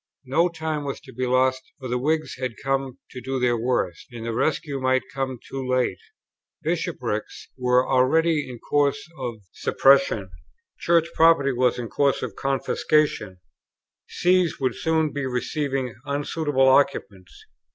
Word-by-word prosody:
No 165 +7 +2
time 160 -3 -3
was 140 -1 -4
to 130 - -14
be 125 +2 -2
lost, 130 +1 +2 0.2
for 130 - -7
the 125 0 -1
Whigs 155 +3 -1
had 130 -3 -4
come 135 -1 -2
to 125 - -8
do 130 +2 -3
their 125 -1 +2
worst, 115 -7 -1
and 115 -2 -7
the 115 - -2
rescue 150 +2 -1
might 130 0 +2
come 130 -1 -3
too 135 -1 -5
late. 130 -7 +1 0.6
Bishopricks 105 +1 -3
were 125 0 +2
already 150 +4 +2
in 125 - -7
course 145 +3 0
of 120 -5 -5
suppression; 135 -8 +3 0.5
Church 170 -1 +3
property 160 -4 +5
was 125 0 +2
in 120 -2 -4
course 140 +3 +1
of 110 - -5
confiscation; 135 -7 0 0.7
Sees 180 -2 +2
would 130 -1 0
soon 160 -2 0
be 140 -2 -2
receiving 130 0 -2
unsuitable 145 -1 0
occupants. 105 -8 +1
130 Hz, 145 wpm, -24 LUFS, 125-145 Hz, 0.7 s, property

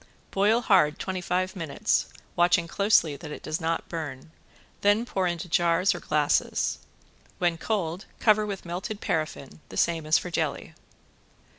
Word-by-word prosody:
Boil 210 +4 +3
hard 185 -10 +4
twenty 185 -1 -3
five 185 +2 -1
minutes, 165 -6 0 0.3
watching 175 0 +3
closely 200 -6 +3
that 150 - -9
it 150 - -8
does 155 +3 -3
not 165 +1 -1
burn, 155 -3 -6 0.5
then 205 +3 +3
pour 190 -6 -1
into 175 0 -3
jars 175 +2 +3
or 175 - -6
glasses. 150 -2 +1 0.6
When 175 -2 +1
cold 185 -3 -2
cover 215 -1 +4
with 195 -3 -5
melted 185 +5 -4
paraffin, 155 -5 -3
the - - -8
same 165 -2 +1
as 155 - +5
for 180 - -5
jelly. - - -2
175 Hz, 150 wpm, -27 LUFS, 160-195 Hz, 0.6 s, as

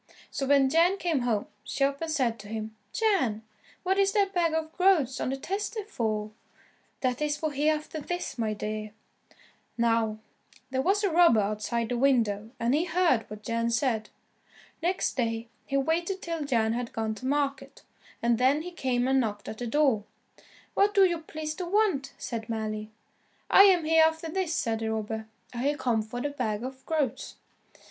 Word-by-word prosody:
So 270 - -2
when 275 -1 +5
Jan 335 +7 +3
came 335 -7 0
home, 235 -4 0 0.2
she 275 - -2
up 275 +1 0
and 325 - -2
said 250 -8 0
to 205 - -10
him, 220 0 -5 0.2
"Jan, 265 - +1 0.4
what 380 +1 +1
is 395 0 +3
that 400 -2 +2
bag 340 -3 +2
of 320 0 -2
groats 350 -9 +3
on - - -1
the 270 - -2
tester 410 +7 -3
for?" 215 - -2 0.7
"That 255 +1 0
is 300 0 0
for 310 0 -2
Hereafterthis, 305 +1 -2
my 215 -2 0
dear." 215 0 -4 0.8
Now, 230 -2 +2 0.5
there 260 0 +1
was 400 +8 +2
a 395 - +2
robber 335 -9 +6
outside 215 +3 -2
the 245 -1 -1
window, 225 -6 +2
and 235 +2 +1
he 315 +4 +2
heard 335 -10 +2
what 210 0 -9
Jan 230 +2 0
said. 230 -3 0 0.7
Next 360 +3 0
day, 230 -1 -1 0.2
he 275 - 0
waited 340 +7 0
till 330 -3 -3
Jan 225 -5 +1
had 240 0 -4
gone 220 -1 -1
to 255 +4 -6
market, 275 -1 -2 0.4
and 235 -1 +2
then 275 +5 +3
he 360 - -6
came 255 -7 0
and 265 0 +3
knocked 210 -4 -2
at 220 - -6
the 245 - -3
door. 265 -5 +2 0.7
"What 410 +2 +3
do 395 - +7
you 345 -2 0
please 310 -1 -5
to 365 - -3
want?" 365 -9 +1
said 230 -2 -5
Mally. 215 -1 -3 0.6
"I 390 - +9
am 365 -4 +5
Hereafterthis," 320 +2 +2
said 230 -8 0
the 220 0 -2
robber, 220 0 -4 0.3
"I - - -7
have 290 0 0
come 235 -6 +1
for 220 +3 -6
the 290 +4 -1
bag 220 -6 -2
of 260 +1 -7
groats." 300 -7 -1
270 Hz, 180 wpm, -28 LUFS, 225-325 Hz, 0.8 s, I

